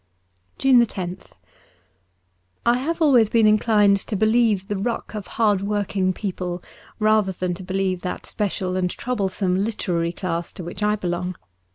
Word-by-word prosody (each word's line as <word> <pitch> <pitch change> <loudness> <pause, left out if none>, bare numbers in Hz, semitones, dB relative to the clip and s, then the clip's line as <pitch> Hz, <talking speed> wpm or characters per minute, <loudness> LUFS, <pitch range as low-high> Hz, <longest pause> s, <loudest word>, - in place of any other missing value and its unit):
173 240 -7 +3
JUNE 175 +1 -5
loth - - -24 1.3
I 240 +1 +4
HAVE 325 +5 -1
always 245 -8 +5
been 225 -1 +4
inclined 210 -1 +4
to 205 - -4
believe 220 -2 +2
the 205 - -2
ruck 225 +5 -3
of 210 -3 -6
hard 210 -4 +3
working 200 -2 0
people 180 -2 -4 0.3
rather 215 -3 +2
than 180 0 -2
to 180 - -8
believe 185 -1 -1
that 180 - -5
special 190 -3 -2
and 185 -1 0
troublesome 190 -5 -1
literary 180 -5 -1
class 170 -2 -3
to 185 - -7
which 170 - -7
I 210 0 +2
belong. 180 -2 -3
200 Hz, 155 wpm, -23 LUFS, 185-215 Hz, 1.3 s, always